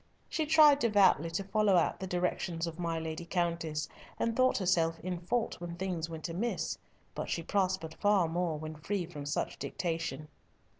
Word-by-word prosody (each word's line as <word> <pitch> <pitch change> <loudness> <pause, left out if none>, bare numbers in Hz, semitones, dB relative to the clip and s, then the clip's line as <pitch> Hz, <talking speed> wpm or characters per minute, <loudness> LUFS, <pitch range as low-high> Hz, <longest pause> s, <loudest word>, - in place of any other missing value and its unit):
She 315 -2 -1
tried 300 -2 +7
devoutly 200 - +4
to 165 +4 -2
follow 200 0 +2
out 175 - +2
the 190 - -4
directions 175 -1 -1
of 165 0 -6
my 165 -1 -1
Lady 160 +1 -4
Countess, 170 -3 -1 0.3
and 230 -1 0
thought 255 +1 +3
herself 165 -4 +2
in 180 0 -3
fault 220 +3 -2
when 170 -1 -5
things 175 -2 -3
went 160 0 -5
amiss, 195 +8 -2 0.3
but - - -4
she 165 - -1
prospered 185 -4 0
far 205 -4 +3
more 170 -1 -1
when 155 +1 -6
free 180 +4 -2
from 150 -4 -8
such 145 - -2
dictation. 165 -4 -3
175 Hz, 170 wpm, -31 LUFS, 165-195 Hz, 0.3 s, tried